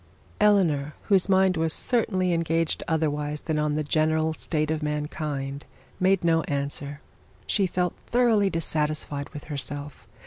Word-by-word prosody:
Eleanor, 170 -9 +3
whose 195 -1 +4
mind 190 -1 +4
was 160 0 +1
certainly 190 -7 0
engaged 165 -1 0
otherwise 150 -2 -1
than 155 -2 -1
on 150 -1 0
the 155 - 0
general 155 +1 +1
state 155 -1 -1
of 160 0 -1
mankind, 150 -2 -3 0.4
made 190 0 +3
no 165 -1 +3
answer 140 0 -3
to - - -6
this. 145 0 -16
She 195 -3 +3
felt 180 0 -1
thoroughly 230 -5 +3
dissatisfied 150 -3 -1
with 145 -1 -9
herself. 145 0 -6
155 Hz, 145 wpm, -26 LUFS, 150-180 Hz, 0.4 s, whose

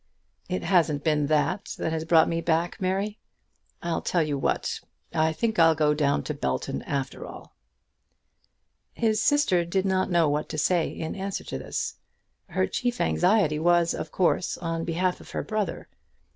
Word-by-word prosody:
"It 185 - -2
hasn't 160 -6 +2
been 150 -2 +2
that 155 +6 0
that 160 - -2
has 160 0 -2
brought 160 -1 +5
me 165 0 -1
back, 170 +4 0
Mary. 195 +3 -1 0.6
I'll 170 -1 -1
tell 175 -3 +1
you 150 -2 -1
what. 135 - -1 0.3
I 160 -1 +2
think 215 +6 -1
I'll 165 -1 +6
go 150 -1 +3
down 140 - +1
to - - -3
Belton 65 +1 -2
after 135 -1 -3
all." - - -11 1.4
His 220 -2 +1
sister 290 -12 +3
did 185 +3 -1
not 190 -1 +1
know 170 -3 +3
what 150 +1 -1
to - - -4
say 170 +2 +2
in 160 - -5
answer 195 0 -4
to - - -5
this. - - -4 0.5
Her - - 0
chief 245 -1 -2
anxiety 180 -5 +2
was, 170 0 +3
of - - -5
course, 180 0 +1
on 165 -1 -3
behalf 180 +2 -1
of - - -14
her - - -3
brother. 210 -5 -3
170 Hz, 170 wpm, -26 LUFS, 155-190 Hz, 1.4 s, I'll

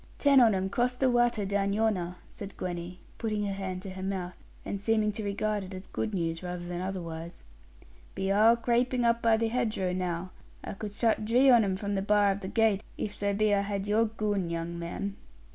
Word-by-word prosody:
'Ten 280 -2 +5
on 225 -4 +5
'em 190 0 0
crossed 245 +5 0
the 260 -2 +3
watter 240 -3 +2
down 200 0 0
yonner,' 200 -5 0
said 200 -1 -10
Gwenny, 175 0 -5 0.2
putting 215 -2 -1
her 200 - -2
hand 190 -1 -4
to 195 - -6
her 185 0 -7
mouth, 185 -2 -3 0.3
and 200 - -4
seeming 215 0 +2
to 215 +1 -5
regard 205 0 -1
it 190 0 -8
as 185 +1 -8
good 220 - -3
news 165 -4 -2
rather 180 -1 -5
than 175 0 -4
otherwise: 170 - -6 0.7
'be 195 0 -1
arl 220 +3 +6
craping 240 +1 +1
up 235 0 +3
by 225 -1 +4
hedgerow 225 -5 0
now. 180 0 -3 0.3
I - - -5
could 205 0 -6
shutt 225 0 +1
dree 250 +5 +5
on 235 -2 +6
'em 190 -2 0
from 200 +1 -3
the 195 - 0
bar 205 0 +3
of 195 - -3
the 190 - -6
gate, 220 -1 +2
if 205 - -3
so 200 0 -1
be 215 0 +2
I 200 - +3
had 200 -1 -3
your 215 +2 +3
goon, 210 -5 -1
young 170 0 -4
man.' 195 +4 -4
200 Hz, 210 wpm, -29 LUFS, 185-220 Hz, 0.7 s, arl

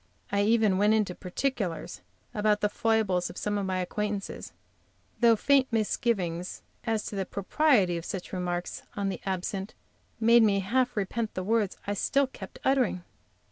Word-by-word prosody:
I 200 - +2
even 215 -2 +3
went 210 +2 +4
into 210 -4 +1
particulars 185 - -3 0.3
about 210 0 +2
the 210 - +2
foibles 220 -6 +1
of - - -10
some 205 -1 -1
of 195 - -2
my 185 -1 -1
acquaintances, 205 +2 -3 0.7
though 235 -1 +6
faint 270 +3 +3
misgivings 200 -6 -1 0.2
as 225 -2 0
to - - -5
the 195 - 0
propriety 200 - +2
of 165 - -6
such 190 -2 -6
remarks 175 -1 -3
on 200 -1 -1
the 190 - -5
absent 190 +1 -3 0.4
made 230 +1 +6
me 200 -3 +3
half 245 +4 0
repent 215 +3 -2
the 185 - -2
words 215 -1 +1
I 205 - -1
still 275 +7 +2
kept 260 - -10
uttering. 255 -9 +2
205 Hz, 160 wpm, -28 LUFS, 185-230 Hz, 0.7 s, though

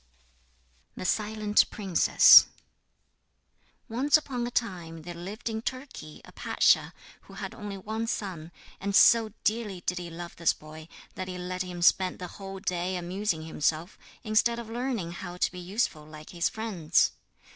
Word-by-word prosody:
THE - - -6
SILENT 210 +1 +2
PRINCESS 190 -5 +7 1.4
Once 265 +5 +3
upon 250 -5 -4
a - - -3
time 175 -9 -3
there 175 +1 -7
lived 195 +8 -7
in 220 -1 -2
Turkey 255 - -7
a - - -14
pasha - - +2 0.4
who - - -12
had - - -6
only 205 -2 -7
one 220 +4 -4
son, 175 -7 -4 0.3
and 200 0 -2
so 225 0 +6
dearly 210 -4 -1
did 180 0 -1
he 175 -1 -7
love 170 +1 -8
this 170 -1 +2
boy 155 +1 -12 0.3
that 185 - -6
he 185 -1 -6
let 180 0 -4
him 180 -1 -5
spend 185 +1 +3
the 180 - -6 0.2
whole 195 0 -7
day 185 -1 -2
amusing 180 -1 -2
himself, 160 +3 -2 0.2
instead 225 +1 +2
of 230 -1 -7
learning 235 -7 -3
how 175 0 -7
to - - +1
be 180 - -9
useful 180 -3 -2
like 155 0 -12
his 175 0 0
friends. 210 -8 +1
185 Hz, 155 wpm, -28 LUFS, 175-220 Hz, 1.4 s, PRINCESS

